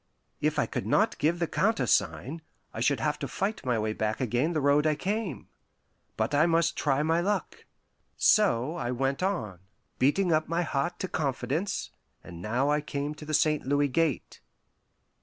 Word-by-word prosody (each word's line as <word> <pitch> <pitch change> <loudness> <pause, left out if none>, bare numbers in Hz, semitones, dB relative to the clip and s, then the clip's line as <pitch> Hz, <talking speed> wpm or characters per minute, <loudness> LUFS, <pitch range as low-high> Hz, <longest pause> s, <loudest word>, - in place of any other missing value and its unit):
If - - 0
I - - +2
could - - -4
not - - +2
give 160 +4 +2
the 170 - 0
countersign, 135 - 0 0.3
I - - -6
should 130 +2 +2
have 150 +4 -1
to 140 - -3
fight 195 - -3
my 125 -3 0
way 110 0 -1
back 110 0 -2
again 130 +6 0
the 155 - +1
road 145 +2 +3
I 155 - +2
came. 195 - -3 0.7
But - - -1
I 150 +3 +4
must 165 0 +2
try 145 -1 +1
my 165 +2 +2
luck. 200 +2 -2 0.5
So 170 - +3
I 120 - -3
went 135 +4 -1
on, 110 - -2 0.4
beating 170 +7 +2
up 155 0 +1
my 170 +1 +1
heart 145 +1 -2
to 190 - -1
confidence; 145 - -2 0.3
and 85 0 -10
now 120 +8 0
I 150 0 +2
came 145 0 -3
to 150 0 -11
the 155 0 0
St. 150 0 +2
Louis 145 +1 +2
Gate. 155 0 -1
150 Hz, 175 wpm, -28 LUFS, 130-165 Hz, 0.7 s, I